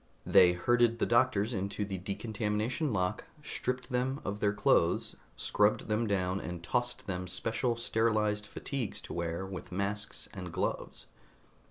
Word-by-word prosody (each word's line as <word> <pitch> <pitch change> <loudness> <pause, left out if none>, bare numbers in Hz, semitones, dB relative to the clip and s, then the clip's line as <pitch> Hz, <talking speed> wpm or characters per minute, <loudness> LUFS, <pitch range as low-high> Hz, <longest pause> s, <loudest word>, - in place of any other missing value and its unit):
They 90 -1 +7
herded 120 +5 +3
the - - +1
doctors 120 -2 +3
into 100 +1 -2
the 95 -2 -4
decontamination 110 - -1
lock, 90 -4 -1 0.2
stripped 125 +1 -3
them 130 +3 0
of 100 +1 -3
their 105 -1 +2
clothes, 100 - +2 0.2
scrubbed 105 +1 +2
them 110 +2 +1
down 95 -1 0
and 90 -1 -6
tossed 120 +7 -1
them 90 -1 -3
special 115 +5 0
sterilized 110 -2 +1
fatigues 130 +1 -4
to - - -8
wear 85 +2 -2
with 95 -1 -7
masks 100 +3 -2
and 90 -3 -6
gloves. - - -3
105 Hz, 145 wpm, -31 LUFS, 95-115 Hz, 0.2 s, They